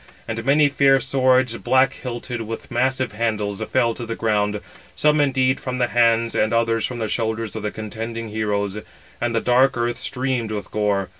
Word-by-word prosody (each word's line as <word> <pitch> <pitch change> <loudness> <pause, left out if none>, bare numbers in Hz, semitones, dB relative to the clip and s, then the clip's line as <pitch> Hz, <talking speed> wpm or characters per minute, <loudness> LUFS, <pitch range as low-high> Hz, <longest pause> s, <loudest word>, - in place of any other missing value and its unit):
And 115 0 -3
many 145 +3 +4
fair 140 -1 +4
swords, 130 -3 +2
black 130 +2 +3
hilted, 120 -1 -5
with 115 +2 -7
massive 130 0 0
handles, 105 -2 -2
fell 115 +1 +1
to 120 - -7
the 115 0 -4
ground, 105 -2 0 0.4
some 150 0 +3
indeed 130 -2 +2
from 130 -1 -4
the 120 -1 +1
hands, 115 -1 +3
and 110 - +1
others 115 -1 +1
from 125 - -6
the 110 -2 -2
shoulders 110 0 -2
of 110 - -4
the 105 - -2
contending 115 +2 -6
heroes; 105 -1 -2 0.4
and 120 -1 0
the 115 - +1
dark 125 +1 +3
earth 120 0 -1
streamed 125 -3 -2
with 105 -3 -5
gore. 100 -2 0
115 Hz, 180 wpm, -22 LUFS, 110-130 Hz, 0.4 s, many